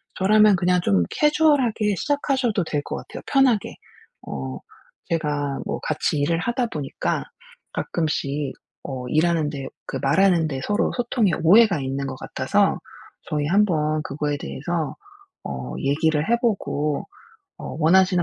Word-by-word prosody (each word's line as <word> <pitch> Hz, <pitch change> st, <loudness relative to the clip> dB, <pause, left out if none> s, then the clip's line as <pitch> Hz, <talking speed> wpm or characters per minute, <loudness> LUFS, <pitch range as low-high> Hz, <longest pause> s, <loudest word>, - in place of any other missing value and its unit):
저라면 210 Hz, +1 st, +5 dB
그냥 180 Hz, 0 st, +2 dB
좀 95 Hz, -, +2 dB
캐주얼하게 280 Hz, -9 st, +2 dB
시작하셔도 260 Hz, -, 0 dB
될 150 Hz, -3 st, -2 dB
것 -, -, -5 dB
같아요 -, -, -9 dB
편하게. 265 Hz, -6 st, +2 dB, 0.5 s
"어 65 Hz, -2 st, -5 dB, 0.5 s
제가 145 Hz, -4 st, -1 dB
뭐 -, -, -2 dB
같이 155 Hz, 0 st, -1 dB
일을 165 Hz, +3 st, +1 dB
하다 240 Hz, +6 st, -1 dB
보니까 150 Hz, -10 st, -3 dB, 0.5 s
가끔씩 150 Hz, -3 st, -2 dB, 0.3 s
어 130 Hz, -2 st, -5 dB
일하는데 155 Hz, -4 st, +1 dB, 0.2 s
그 135 Hz, -, -3 dB
말하는 170 Hz, +2 st, +3 dB
데 135 Hz, -3 st, -4 dB
서로 210 Hz, -, +1 dB
소통에 235 Hz, -4 st, +1 dB
오해가 195 Hz, 0 st, +6 dB
있는 135 Hz, +1 st, -3 dB
것 130 Hz, -, -5 dB
같아서 -, -, 0 dB, 0.5 s
저희 150 Hz, -1 st, 0 dB
한번 155 Hz, -5 st, +2 dB
그거에 145 Hz, 0 st, -2 dB
대해서 160 Hz, +3 st, -3 dB, 0.5 s
어 65 Hz, -2 st, -5 dB
얘기를 150 Hz, +4 st, +1 dB
해 235 Hz, -, +5 dB
보고 155 Hz, -, 0 dB, 0.6 s
어 -, -, -7 dB
원하시는 180 Hz, +2 st, +4 dB
165 Hz, 285 characters per minute, -23 LUFS, 145-210 Hz, 0.6 s, 오해가